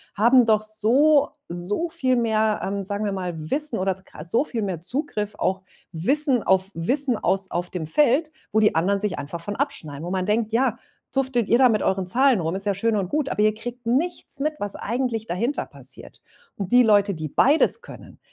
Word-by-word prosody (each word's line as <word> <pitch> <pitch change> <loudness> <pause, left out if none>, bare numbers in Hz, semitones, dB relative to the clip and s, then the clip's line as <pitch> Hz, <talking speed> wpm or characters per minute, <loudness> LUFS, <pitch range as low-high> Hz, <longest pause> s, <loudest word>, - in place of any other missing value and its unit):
haben 240 +4 +5
doch 215 -1 +3
so 240 +8 +3 0.2
so 180 - -2
viel 260 -5 0
mehr, 220 -2 +1
ähm, 200 0 -3
sagen 205 +2 -3
wir 205 - -1
mal, 185 -2 -3 0.2
Wissen 295 -6 -1
oder 190 0 -2 0.2
so 235 - +2
viel 235 -6 -3
mehr 185 -5 -3
Zugriff 210 - -3
auch 190 0 -1 0.3
Wissen 255 - +2
auf 190 0 +2
Wissen 250 - +1
aus 195 -1 0
auf 175 +1 -3
dem 165 -4 -4
Feld, 300 - +2 0.2
wo 220 - +4
die 215 -5 +3
anderen 195 +5 +1
sich 210 -2 -1
einfach 150 +4 -6
von 205 +4 -4
abschneiden. 160 - -4
Wo 175 - -5
man 185 -1 -1
denkt, 215 +1 0
ja, 240 -1 +1 0.3
tüftelt 260 -5 0
ihr 235 - +5
da 255 0 +6
mit 215 -2 +1
euren 190 -1 0
Zahlen 255 +3 +3
rum? 165 +1 -2
Ist 195 +1 -3
ja 200 - +1
schön 225 +3 0
und 195 -3 -1
gut, 295 +2 -1
aber - - -1
ihr 215 0 +3
kriegt 240 +1 -8
nichts 300 +3 -1
mit, 305 +2 0
was 205 -1 -3
eigentlich 235 -1 -2
dahinter 225 +10 -2
passiert. - - -9 0.4
Und 195 -3 -5
die 250 0 +6
Leute, 205 -3 +3
die 155 -1 -5
beides 300 - +3
können, 485 - -13
215 Hz, 205 wpm, -23 LUFS, 190-255 Hz, 0.4 s, da